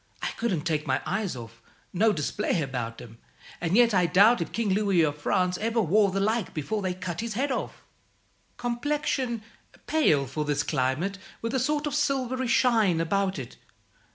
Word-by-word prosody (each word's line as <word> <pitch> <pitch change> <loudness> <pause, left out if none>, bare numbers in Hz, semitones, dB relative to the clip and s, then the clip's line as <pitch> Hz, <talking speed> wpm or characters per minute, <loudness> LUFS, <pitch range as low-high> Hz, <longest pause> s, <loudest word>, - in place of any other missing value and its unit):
I - - 0
couldn't 210 -9 -1
take 155 -2 -2
my 130 0 +1
eyes 205 -9 -2
off 115 -1 -10 0.3
no 215 +4 +3
display 165 0 -1
about 125 -4 -4
'em 115 -1 -14 0.4
and 175 +2 0
yet 235 -2 +5
I 180 -2 +3
doubt 205 +9 +5
if - - -3
King 230 -3 -1
Louis 195 -3 +3
of 145 -2 0
France 180 +4 0
over 230 +1 0
wore 205 +1 +3
the 195 +1 -1
like 215 +1 0
before 185 +8 -2
they 185 -2 -2
cut 180 -1 -4
his 230 -2 -4
head 275 +4 0
off. - - -4 0.7
Complexion, 245 -1 -1 0.4
pale 155 - +3
for 135 +4 -3
this 145 -1 0
climate, 150 +8 -1 0.2
with 230 - -2
a 265 - +2
sort 295 +4 0
of 295 - -2
silvery 260 -3 0
shine 230 -8 +3
about 190 +3 0
it. 130 -4 -8
195 Hz, 180 wpm, -27 LUFS, 155-235 Hz, 0.7 s, yet